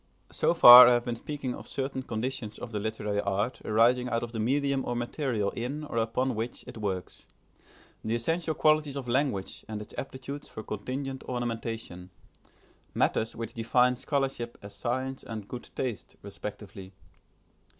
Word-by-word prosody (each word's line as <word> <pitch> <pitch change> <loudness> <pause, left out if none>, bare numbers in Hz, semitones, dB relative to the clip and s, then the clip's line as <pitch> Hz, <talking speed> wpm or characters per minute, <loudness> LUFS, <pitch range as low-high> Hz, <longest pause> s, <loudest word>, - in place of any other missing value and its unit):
So 170 - +2
far 125 -5 +12
I 125 - +6
have 120 0 +1
been 120 - -2
speaking 135 0 -4
of - - -9
certain 135 -1 -3
conditions 120 -1 -4
of 120 - -7
the 105 - -2
literary 105 -1 -2
art 100 +5 -1
arising 120 +3 +3
out 115 -1 0
of 120 - -5
the 115 - -5
medium 135 +3 +1
or 120 - -2
material 120 -4 -1
in 140 +6 -4
or 145 - -5
upon 115 +3 0
which 115 +2 -4
it - - -9
works, 95 -4 -4 0.8
the 110 +1 0
essential 160 +7 -1
qualities 155 -2 +3
of 135 -3 -5
language 120 -6 -1
and 110 -1 -5
its 105 - -9
aptitudes 135 +2 -7
for 110 - -8
contingent 130 +6 -5
ornamentation, 115 -7 -4 0.9
matters 110 - +1
which 115 -1 -6
define 125 +2 +3
scholarship 135 -3 -2
as 100 - -9
science 130 +2 -3
and 110 -3 -7
good 125 +2 -8
taste 125 -6 -4
respectively. 100 -1 -8
120 Hz, 160 wpm, -28 LUFS, 110-130 Hz, 0.9 s, far